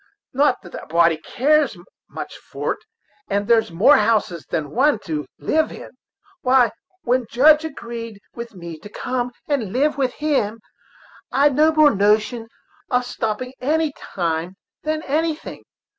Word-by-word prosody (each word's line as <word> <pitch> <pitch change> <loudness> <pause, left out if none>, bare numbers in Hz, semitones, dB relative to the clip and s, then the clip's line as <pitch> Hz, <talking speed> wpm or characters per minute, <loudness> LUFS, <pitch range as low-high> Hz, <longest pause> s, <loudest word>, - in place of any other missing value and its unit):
Not 275 0 +2
that 175 - -13
a - - -13
body 170 0 +3
cares 285 - +1 0.3
much - - -7
for't, - - -4 0.5
as 200 +1 0
there's 225 +1 +3
more 200 - +6
houses 210 -7 +1
than 150 -3 -2
one 275 - +3
to 150 -2 -3
live 315 0 +1
in. - - -10 0.5
Why, 255 -3 +4 0.3
when 250 +1 +2
the 240 - -10
Judge 300 +5 +5
agreed 235 -7 -7
with 235 -2 -8
me 170 -3 -8
to 205 - -11
come 250 +3 -3 0.2
and 255 -10 -1
live 280 +5 +1
with 255 -2 0
him, 265 -8 0 0.7
I'd 280 +2 +4
no 310 +2 +5
more 310 -2 +5
notion 215 +3 +2 0.4
of 250 0 +1
stopping 245 +2 -3
any 305 +2 +1 0.2
time 170 0 -1 0.3
than 310 0 -2
anything. 315 +2 -2
245 Hz, 145 wpm, -21 LUFS, 205-290 Hz, 0.7 s, more